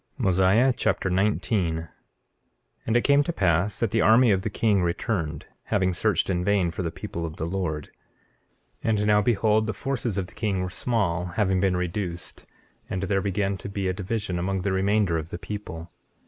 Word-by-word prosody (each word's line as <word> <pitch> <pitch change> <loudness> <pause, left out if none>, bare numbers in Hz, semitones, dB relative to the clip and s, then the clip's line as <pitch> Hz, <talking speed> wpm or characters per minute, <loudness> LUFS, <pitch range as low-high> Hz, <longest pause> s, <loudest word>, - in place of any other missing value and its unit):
Mosiah 100 +3 +3
Chapter 90 - 0
19 95 -2 +1
19:1 80 0 -6 1.0
And 115 +1 +3
it 120 - +1
came 140 0 +5
to 170 - -2
pass 95 - +1
that 115 - -1
the 115 - +2
army 115 +1 +6
of 95 -1 +2
the 110 - -2
king 105 -1 +2
returned, 85 - -2 0.2
having 95 -2 +1
searched 105 +4 +1
in 90 -2 0
vain 95 -3 +2
for 85 - -5
the 85 - -1
people 85 +1 -6
of 80 -2 -5
the 80 - -3
Lord. 85 -4 -3 0.9
19:2 - - 0
And 105 -1 +2
now 105 0 +4
behold, 110 0 +2
the 110 - -1
forces 125 -6 -2
of 95 - -1
the - - -16
king 100 -4 -1
were 90 - -4
small, 90 -7 0
having 95 0 0
been 95 -1 +2
reduced, 90 -1 -4 0.4
and 95 +1 -2
there 95 0 +1
began 100 0 -1
to - - -7
be 100 -1 -2
a 95 - 0
division 95 -1 -3
among 95 +1 -1
the 100 - 0
remainder 95 -2 +2
of 80 +1 -7
the - - -5
people. 90 -4 -7
95 Hz, 195 wpm, -25 LUFS, 90-105 Hz, 1.0 s, army